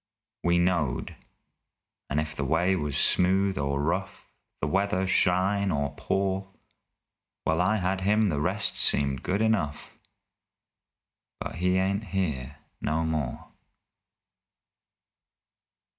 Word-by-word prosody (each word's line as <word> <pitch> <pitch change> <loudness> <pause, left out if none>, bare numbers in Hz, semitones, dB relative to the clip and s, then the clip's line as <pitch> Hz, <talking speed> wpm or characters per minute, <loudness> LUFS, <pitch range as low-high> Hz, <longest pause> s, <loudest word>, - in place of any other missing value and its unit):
We 85 0 +3
knowed 85 -7 0 0.9
and 70 - 0
if 75 0 -3
the 75 - -2
way 85 +7 +2
was 75 -5 -2
smooth 95 +2 +3
or 70 0 -1
rough, 90 +6 -2 0.3
The - - -1
weather 95 +3 +1
shine 95 +2 +2
or 70 -4 -1
pour, 95 0 -1 0.9
While 80 +2 +1
I 105 +4 +2
had 95 0 -1
him 105 +2 +3
the 75 -4 -1
rest 95 +5 0
seemed 70 -2 +3
good 100 +4 0
enough 95 -10 -1 1.4
But - - -5
he 90 +2 +2
ain't 100 +3 0
here 80 -9 -2 0.3
no 80 +2 0
more! 75 -6 -3
90 Hz, 115 wpm, -27 LUFS, 75-95 Hz, 1.4 s, We